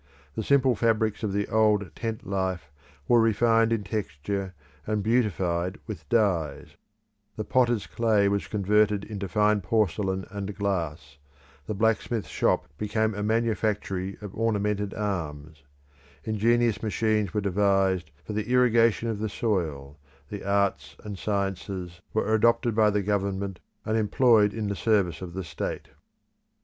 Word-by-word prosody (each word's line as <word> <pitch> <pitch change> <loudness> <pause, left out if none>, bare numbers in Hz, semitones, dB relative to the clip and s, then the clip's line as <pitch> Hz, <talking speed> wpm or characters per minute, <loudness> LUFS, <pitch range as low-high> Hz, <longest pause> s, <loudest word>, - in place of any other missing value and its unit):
The - - -3
simple 135 +2 +3
fabrics 110 -1 +1
of 105 -3 -1
the 100 +1 -1
old 105 -3 +2
tent 115 -1 -4
life 95 -6 -2 0.4
were 120 -1 +5
refined 115 +1 +3
in 115 -3 0
texture 95 0 -4 0.3
and 105 -1 0
beautified 95 -6 0
with 80 -9 -8
dyes; 90 -10 0 0.6
the - - -3
potter's 120 -4 +2
clay 110 -3 +2
was 100 0 0
converted 105 0 +2
into 100 -2 -5
fine 105 +3 +2
porcelain 95 -1 0
and 100 0 -5
glass, 80 -8 -3 0.5
the 110 - -3
blacksmith's 110 +1 0
shop - - +1
became 110 +1 0
a 105 - -4
manufactory 105 -3 -1
of 105 -2 -8
ornamented 105 -2 -1
arms; 80 -7 -4 0.6
ingenious 115 0 +1
machines 110 -2 0
were 105 - -1
devised 95 -3 +1
for 105 - -6
the 105 +2 -3
irrigation 115 -2 +3
of 110 -3 -2
the 110 0 -2
soil 80 - -2 0.3
the 105 - -6
arts 100 -8 0
and 105 -3 -7
sciences 95 -3 -3
were 110 0 0
adopted 115 +2 +3
by 105 0 +4
the 105 -1 0
government, 100 -1 -2 0.3
and 110 - 0
employed 110 -1 +4
in 110 0 -4
the 100 - -2
service 95 -7 +1
of 90 -1 -7
the 95 - -3
state. 80 -3 -5
105 Hz, 140 wpm, -26 LUFS, 95-110 Hz, 0.6 s, were